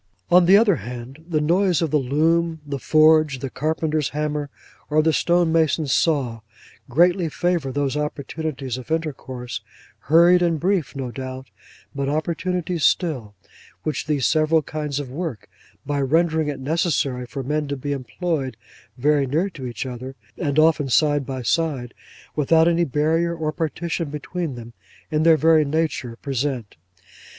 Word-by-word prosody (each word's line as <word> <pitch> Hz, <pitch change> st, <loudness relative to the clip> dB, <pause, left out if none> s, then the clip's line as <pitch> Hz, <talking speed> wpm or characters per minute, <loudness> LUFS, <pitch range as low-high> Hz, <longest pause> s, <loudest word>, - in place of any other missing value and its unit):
On 175 Hz, 0 st, +6 dB
the 195 Hz, +2 st, +8 dB
other 205 Hz, -6 st, +4 dB
hand, 125 Hz, +6 st, -8 dB
the 155 Hz, -3 st, +1 dB
noise 175 Hz, +2 st, +2 dB
of 160 Hz, -4 st, -1 dB
the 150 Hz, -, +3 dB
loom, 160 Hz, +5 st, +1 dB
the 140 Hz, -1 st, -4 dB
forge, 155 Hz, -1 st, +4 dB
the 130 Hz, 0 st, -5 dB
carpenter's 155 Hz, 0 st, -1 dB
hammer, 150 Hz, 0 st, -2 dB, 0.4 s
or 155 Hz, 0 st, +3 dB
the 160 Hz, 0 st, +2 dB
stonemason's 160 Hz, -4 st, +2 dB
saw, 135 Hz, -8 st, +1 dB, 0.5 s
greatly 175 Hz, +5 st, +3 dB
favour 170 Hz, -4 st, -1 dB
those 140 Hz, 0 st, -1 dB
opportunities 150 Hz, -3 st, -4 dB
of 130 Hz, -, -12 dB
intercourse—hurried 155 Hz, +3 st, 0 dB
and 170 Hz, -3 st, +1 dB
brief 170 Hz, -8 st, 0 dB
no 130 Hz, -3 st, -4 dB
doubt, 130 Hz, +1 st, -7 dB, 0.4 s
but 140 Hz, -1 st, -2 dB
opportunities 170 Hz, +2 st, -2 dB
still—which 130 Hz, -, -2 dB
these 145 Hz, -4 st, +1 dB
several 155 Hz, 0 st, +3 dB
kinds 150 Hz, -1 st, -3 dB
of 135 Hz, -3 st, -6 dB
work, 155 Hz, -5 st, -5 dB, 0.4 s
by 145 Hz, -1 st, -1 dB
rendering 160 Hz, +2 st, +2 dB
it 145 Hz, -2 st, -3 dB
necessary 140 Hz, -4 st, -1 dB
for 135 Hz, +2 st, -5 dB
men 150 Hz, +3 st, -1 dB
to 140 Hz, 0 st, -3 dB
be 145 Hz, +2 st, -4 dB
employed 140 Hz, -1 st, -3 dB, 0.4 s
very 145 Hz, +1 st, +2 dB
near 165 Hz, +9 st, 0 dB
to 135 Hz, -7 st, -7 dB
each 120 Hz, +1 st, -5 dB
other, 130 Hz, +1 st, -7 dB, 0.2 s
and 145 Hz, -4 st, -2 dB
often 155 Hz, -3 st, +4 dB
side 145 Hz, 0 st, +2 dB
by 130 Hz, -2 st, -4 dB
side, 135 Hz, -2 st, -1 dB, 0.4 s
without 160 Hz, +2 st, +4 dB
any 170 Hz, 0 st, +3 dB
barrier 160 Hz, +4 st, +1 dB
or 155 Hz, -2 st, -2 dB
partition 165 Hz, +1 st, -3 dB
between 150 Hz, +1 st, -4 dB
them, 120 Hz, -1 st, -10 dB, 0.4 s
in 155 Hz, 0 st, +1 dB
their 160 Hz, 0 st, +6 dB
very 160 Hz, 0 st, +5 dB
nature 150 Hz, -5 st, -2 dB
present. 130 Hz, -3 st, -3 dB
150 Hz, 145 wpm, -22 LUFS, 135-165 Hz, 0.5 s, the